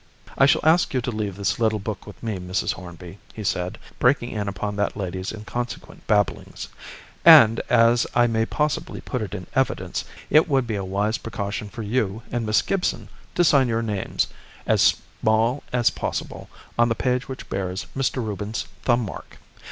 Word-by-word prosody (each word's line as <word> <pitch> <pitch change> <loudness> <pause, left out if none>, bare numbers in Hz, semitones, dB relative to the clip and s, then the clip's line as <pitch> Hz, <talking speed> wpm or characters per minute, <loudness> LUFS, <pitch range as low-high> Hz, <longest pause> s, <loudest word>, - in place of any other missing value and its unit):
"I 135 - +5
shall - - +4
ask 160 -3 +4
you 130 - +2
to 120 - -3
leave 105 -4 -3
this 100 0 -1
little 110 -2 +2
book 105 +1 -6
with 105 - -12
me, 110 -4 -2
Mrs. 90 +1 -1
Hornby," 90 +1 -10 0.2
he 110 - -6
said, 90 +2 -1 0.2
breaking 125 -1 +2
in 105 -1 -3
upon 100 +1 -3
that 105 0 -1
lady's 95 -1 -3
inconsequent 115 +3 -6
babblings, 105 -2 0 0.5
"and, 115 +1 +9
as 115 0 +4
I 120 - +5
may 115 -1 +1
possibly 150 -1 -1
put 125 - -4
it 105 -2 -4
in 90 -3 -6
evidence, 135 -1 0 0.3
it 155 +3 +5
would 135 -3 +2
be 115 - -3
a 100 - -2
wise 100 +4 -1
precaution 100 -1 -4
for 115 - -7
you 110 -1 -1
and 115 -2 -2
Miss 110 - +3
Gibson 195 -2 -1 0.3
to 175 - +4
sign 140 -6 +5
your 115 0 0
names 105 -4 -1 0.4
as - - +4 0.3
small 115 +5 +2
as 120 -2 +3
possible - - -4 0.3
on 120 0 +5
the 115 - +1
page 125 +3 -1
which 130 - -7
bears 95 -1 -3
Mr. 130 -2 0
Reuben's 105 -3 -3 0.2
thumb 120 -1 +3
mark. 95 - -9
110 Hz, 180 wpm, -24 LUFS, 100-120 Hz, 0.5 s, and